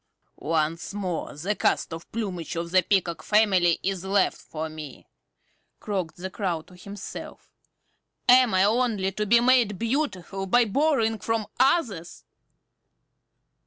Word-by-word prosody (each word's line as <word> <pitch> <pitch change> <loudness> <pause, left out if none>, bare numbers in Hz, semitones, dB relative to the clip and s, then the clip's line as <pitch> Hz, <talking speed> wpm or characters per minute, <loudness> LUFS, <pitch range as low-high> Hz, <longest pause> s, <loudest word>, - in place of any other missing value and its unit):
"Once 165 +4 -1
more 185 -7 -4
the 175 +8 -2
cast - - 0
off 165 +1 -9
plumage 185 -8 -4
of 170 0 -4
the 185 0 +5
Peacock 180 -3 0
family 190 -6 +3
is 190 -2 -2
left 195 0 +2
for 160 0 -5
me!" 155 -4 -10 0.7
croaked 185 -6 -4
the 185 +1 -6
Crow 175 -5 -2
to 180 - -18
himself. 200 +2 -9 0.8
"Am 250 -1 +6
I 185 - +4
only 215 -3 +1
to 210 +2 -3
be 235 +3 +6
made 240 -5 +3
beautiful 210 - -2
by 240 +5 +4
borrowing 225 -2 +1
from 225 +2 -1
others? 245 - +1
195 Hz, 130 wpm, -25 LUFS, 175-225 Hz, 0.8 s, Am